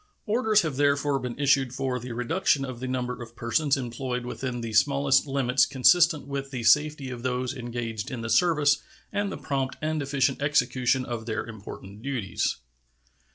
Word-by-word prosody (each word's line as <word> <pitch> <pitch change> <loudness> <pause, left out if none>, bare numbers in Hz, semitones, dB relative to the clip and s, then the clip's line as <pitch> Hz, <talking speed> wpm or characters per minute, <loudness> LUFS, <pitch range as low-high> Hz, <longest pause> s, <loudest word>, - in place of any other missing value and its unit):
Orders 215 -2 +3
have 155 -5 -3
therefore 140 0 +2
been 125 -2 -5
issued 135 -3 +2
for 130 -2 -1
the 125 +1 -7
reduction 135 +3 +1
of 130 -3 -7
the 130 - -4
number 125 -1 -3
of 120 0 -10
persons 135 +5 +1
employed 125 0 -4
within 125 -1 -4
the 115 -1 -5
smallest 140 +4 +3
limits 135 -1 +2
consistent 150 +4 +4
with 140 -1 -4
the 125 -4 -5
safety 150 +3 +3
of 120 -1 -6
those 125 0 -1
engaged 120 -4 -4
in 125 -3 -5
the 115 - -4
service 150 +1 +3 0.3
and 205 -1 -1
the - - -5
prompt 135 -2 -2
and 155 0 -1
efficient 140 -1 0
execution 130 -3 +1
of 115 -2 -5
their 110 -1 -2
important 105 -2 -10
duties. 120 -8 -1
130 Hz, 170 wpm, -26 LUFS, 120-140 Hz, 0.3 s, consistent